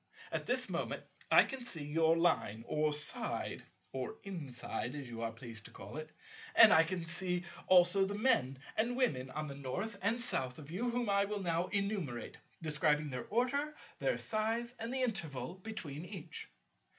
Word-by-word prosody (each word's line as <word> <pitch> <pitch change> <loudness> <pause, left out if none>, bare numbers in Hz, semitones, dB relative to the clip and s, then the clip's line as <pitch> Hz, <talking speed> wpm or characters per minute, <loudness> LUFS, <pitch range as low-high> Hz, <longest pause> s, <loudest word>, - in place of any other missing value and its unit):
And - - 0
at - - -16
this - - +2
moment - - -2 0.3
I - - +8
can 265 -2 -5
see 170 -11 -3
your 160 +2 +3
Line, 160 -10 +2
or 150 0 +1
side—or 150 0 -1
inside 140 -7 -4
as 140 -3 -5
you 115 -1 -6
are 115 0 -1
pleased 115 -2 -8
to - - -10
call 100 +9 -9
it; 155 0 -6 0.4
and 225 -2 +10
I 160 - +7
can 170 0 -3
see 180 +1 -1 0.2
also 185 +1 +6
the 200 +1 -3
Men 210 - +3 0.2
and 240 +3 +1
Women 135 - +1
on 155 +3 -4
the 140 - -5
North 190 - -4
and 225 +4 +2
South 130 - 0
of 155 0 -10
you, 230 +8 -1
whom 240 -1 0
I 200 0 +3
will 205 -1 -3
now 170 0 +1
enumerate, 195 - -2 0.2
describing 150 -1 +2
their 125 -1 -4
order, 280 +6 +1 0.2
their - - +1
size, 225 +2 -1
and 230 +1 -3
the 260 0 0
interval 160 - -2
between 180 -7 -6
each." 175 -4 -7
175 Hz, 175 wpm, -35 LUFS, 145-215 Hz, 0.4 s, and